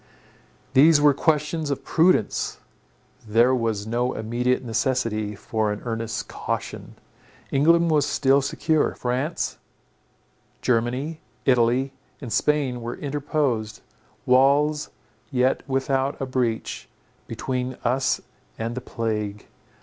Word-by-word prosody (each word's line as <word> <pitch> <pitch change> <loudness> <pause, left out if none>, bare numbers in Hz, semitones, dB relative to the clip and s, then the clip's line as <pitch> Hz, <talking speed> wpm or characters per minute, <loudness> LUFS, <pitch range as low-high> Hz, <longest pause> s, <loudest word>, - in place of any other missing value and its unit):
These 150 +3 +7
were 145 -1 +5
questions 150 +1 0
of 140 - -2
prudence; 165 - +2 0.7
there 115 +4 +4
was 115 -4 -1
no 120 +3 0
immediate 120 +4 -1
necessity 115 -3 -1
for 110 +1 -1
an 105 - -5
earnest 115 -1 -3
caution. - - -5 0.6
England 165 +4 +4
was 150 -2 +3
still 135 0 +3
secure. 155 +3 0
France, 130 +7 -2 1.0
Germany, 125 +7 0 0.3
Italy 125 +1 +3 0.3
and 125 -6 -5
Spain, 140 -5 +1
were 115 +1 -4
interposed, 140 -6 -2 0.4
walls 140 +4 +3 0.4
yet 130 -2 +1
without 135 +1 0
a 135 - -2
breach, 125 -3 -2 0.4
between 130 -1 -3
us 130 +2 +1 0.4
and 115 +1 -3
the 130 - -5
plague. 105 -4 -3
130 Hz, 105 wpm, -24 LUFS, 115-145 Hz, 1.0 s, These